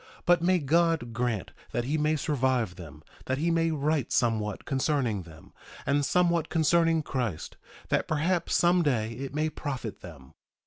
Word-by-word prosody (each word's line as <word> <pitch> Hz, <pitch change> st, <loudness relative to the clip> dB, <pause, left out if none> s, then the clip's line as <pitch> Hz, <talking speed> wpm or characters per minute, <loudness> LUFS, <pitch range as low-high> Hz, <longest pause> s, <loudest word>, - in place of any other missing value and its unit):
But 175 Hz, -1 st, +4 dB
may 185 Hz, +2 st, +3 dB
God 165 Hz, -4 st, +1 dB
grant 115 Hz, -4 st, -2 dB, 0.2 s
that 120 Hz, -, 0 dB
he 140 Hz, +5 st, -1 dB
may 155 Hz, 0 st, +1 dB
survive 130 Hz, -9 st, 0 dB
them, 80 Hz, -3 st, -11 dB, 0.2 s
that 130 Hz, -, -1 dB
he 165 Hz, +4 st, +1 dB
may 165 Hz, 0 st, +2 dB
write 150 Hz, -3 st, 0 dB
somewhat 110 Hz, -4 st, 0 dB
concerning 130 Hz, -6 st, 0 dB
them, 80 Hz, -2 st, -15 dB, 0.3 s
and 145 Hz, +1 st, +2 dB
somewhat 170 Hz, +1 st, +2 dB
concerning 165 Hz, 0 st, +3 dB
Christ, 120 Hz, -, -3 dB, 0.3 s
that -, -, +1 dB
perhaps 170 Hz, +3 st, 0 dB
some 175 Hz, +1 st, +4 dB
day 115 Hz, -8 st, 0 dB
it 135 Hz, +4 st, -6 dB
may 155 Hz, +1 st, +1 dB
profit 135 Hz, -8 st, -5 dB
them. 70 Hz, -7 st, -12 dB
140 Hz, 160 wpm, -28 LUFS, 115-165 Hz, 0.3 s, But